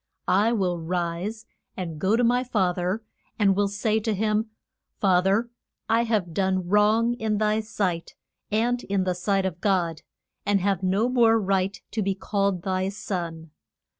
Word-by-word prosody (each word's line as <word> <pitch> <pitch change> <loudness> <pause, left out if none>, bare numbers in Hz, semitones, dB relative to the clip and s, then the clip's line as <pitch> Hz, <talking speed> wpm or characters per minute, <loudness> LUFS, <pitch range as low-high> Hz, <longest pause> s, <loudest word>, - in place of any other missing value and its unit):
I 205 +5 +3
will 185 -6 0
rise 175 +5 -3 0.3
and 165 -5 -5
go 195 +6 +2
to 245 - +2
my 245 +2 +3
fa 205 -8 +1
ther, 185 +5 -2 0.3
and 195 -2 +3
will 205 +1 +2
say 215 +2 0
to 220 -1 -1
him, 215 +2 0 0.5
Fa 185 -3 +4
ther, 215 +5 +1 0.4
I 230 +1 +2
have 205 -7 -1
done 190 -1 0
wrong 215 +4 +3
in 215 -1 0
thy 215 +1 +2
sight, 190 -6 -3 0.4
and 240 +3 +1
in 195 -1 0
the 185 -1 0
sight 195 +2 0
of 180 -1 -4
God, 175 -6 +1 0.4
and 205 -1 +2
have 195 -1 0
no 195 +5 +1
more 235 -3 +4
right 195 -1 0
to 220 - -1
be 195 -1 0
called 195 -2 -1
thy 190 0 0
son. 170 -5 -5
200 Hz, 165 wpm, -25 LUFS, 185-220 Hz, 0.5 s, Fa